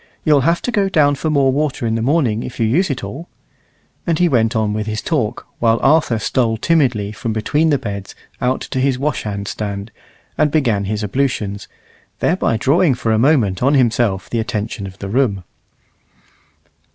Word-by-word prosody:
You'll 150 Hz, -3 st, +4 dB
have 165 Hz, +5 st, +1 dB
to 245 Hz, -, -1 dB
go 200 Hz, -4 st, +1 dB
down 145 Hz, -5 st, +3 dB
for 150 Hz, +3 st, -2 dB
more 140 Hz, -3 st, +3 dB
water 140 Hz, -3 st, -1 dB
in 110 Hz, -, 0 dB
the 115 Hz, -, -1 dB
morning 125 Hz, -4 st, +1 dB
if 125 Hz, -, -8 dB
you 115 Hz, -, +2 dB
use 160 Hz, -, +2 dB
it 130 Hz, -6 st, -3 dB
all." 135 Hz, -, -7 dB, 0.8 s
And 165 Hz, -2 st, +2 dB
on -, -, -6 dB
he 180 Hz, -, +4 dB
went 115 Hz, -5 st, +1 dB
with 110 Hz, -1 st, -1 dB
his 110 Hz, 0 st, -2 dB
talk, 125 Hz, -8 st, -2 dB
while 115 Hz, -1 st, +3 dB
Arthur 140 Hz, -5 st, +3 dB
stole 115 Hz, 0 st, 0 dB
timidly 125 Hz, -8 st, +1 dB
from 110 Hz, +1 st, -4 dB
between 145 Hz, +9 st, +1 dB
the 145 Hz, -, +3 dB
beds 100 Hz, -4 st, -6 dB, 0.3 s
out 125 Hz, +1 st, 0 dB
to 130 Hz, -, -4 dB
his 130 Hz, -1 st, +1 dB
washhand 105 Hz, -8 st, -3 dB
stand, 100 Hz, 0 st, -5 dB, 0.5 s
and 150 Hz, -, +4 dB
began 120 Hz, -10 st, +1 dB
his 105 Hz, +2 st, -2 dB
ablutions, 105 Hz, -3 st, -2 dB, 0.5 s
thereby 160 Hz, -9 st, +1 dB
drawing 145 Hz, +4 st, +3 dB
for 115 Hz, -2 st, -1 dB
a 110 Hz, -, +2 dB
moment 115 Hz, -, +2 dB
on 135 Hz, +4 st, +3 dB
himself 115 Hz, -7 st, +1 dB
the 115 Hz, -, -2 dB
attention 110 Hz, -3 st, -3 dB
of 95 Hz, 0 st, -11 dB
the 100 Hz, -, -6 dB
room. 100 Hz, -4 st, 0 dB
120 Hz, 185 wpm, -18 LUFS, 105-145 Hz, 0.8 s, You'll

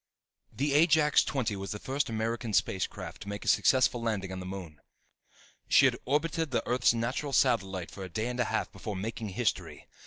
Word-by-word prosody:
_ -, -, -21 dB
The 140 Hz, +1 st, +1 dB
Ajax 155 Hz, -1 st, +5 dB
XX 115 Hz, -7 st, -2 dB
was 95 Hz, 0 st, -6 dB
the -, -, -5 dB
first 135 Hz, +6 st, -2 dB
American 115 Hz, +1 st, -2 dB
space 95 Hz, -2 st, +1 dB
craft -, -, -9 dB
to 100 Hz, -, -7 dB
make 100 Hz, 0 st, -6 dB
a -, -, -8 dB
successful 120 Hz, +2 st, +3 dB
landing 105 Hz, -5 st, -2 dB
on 95 Hz, -, -5 dB
the 90 Hz, -, -7 dB
moon. 90 Hz, -6 st, -8 dB, 0.9 s
She -, -, +6 dB
had -, -, +3 dB
orbited 160 Hz, +4 st, 0 dB
the 130 Hz, -, -1 dB
Earth's 125 Hz, -1 st, +3 dB
natural 125 Hz, +5 st, -2 dB
satellite 95 Hz, -9 st, +1 dB
for 95 Hz, -, -8 dB
a 95 Hz, -, -7 dB
day 110 Hz, +6 st, -2 dB
and 125 Hz, 0 st, -4 dB
a 125 Hz, -, +2 dB
half -, -, -2 dB
before 105 Hz, -, -6 dB
making 110 Hz, +2 st, -4 dB
history. 95 Hz, -, -2 dB
115 Hz, 205 wpm, -29 LUFS, 95-130 Hz, 0.9 s, She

